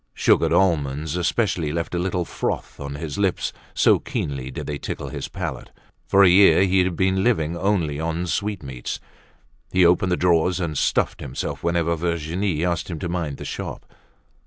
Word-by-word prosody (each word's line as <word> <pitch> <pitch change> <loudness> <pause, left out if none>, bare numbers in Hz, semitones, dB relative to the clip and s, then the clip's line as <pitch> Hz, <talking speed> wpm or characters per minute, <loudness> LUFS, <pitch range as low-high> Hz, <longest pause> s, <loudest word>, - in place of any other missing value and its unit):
Sugared 80 - +3
almonds 80 -4 +1
especially 90 -3 0
left 85 +2 -3
a 90 - 0
little 90 -1 -1
froth - - -4
on 70 0 -5
his 75 +2 -5
lips 95 -3 0 0.2
so - - +4
keenly 70 -2 -4
did 65 - -6
they 75 -1 -4
tickle - - -5
his - - -5
palate. - - -5 0.4
For 100 +1 +5
a - - +8
year 95 +1 +6
he 95 -1 +3
had 90 -1 -1
been 95 +2 +1
living 85 -9 +1
only 85 -6 0
on 85 +2 -2
sweetmeats. 75 -10 -3 0.7
He 90 -1 +4
opened 90 +2 +3
the 90 - +2
drawers 90 +1 +2
and 85 -4 -2
stuffed - - +1
himself 65 - -5
whenever 85 -1 +1
Virginie 85 +1 -1
asked 85 0 -1
him 85 - -4
to 85 - -4
mind 80 -5 -3
the - - -8
shop. - - -6
85 Hz, 175 wpm, -23 LUFS, 80-90 Hz, 0.7 s, a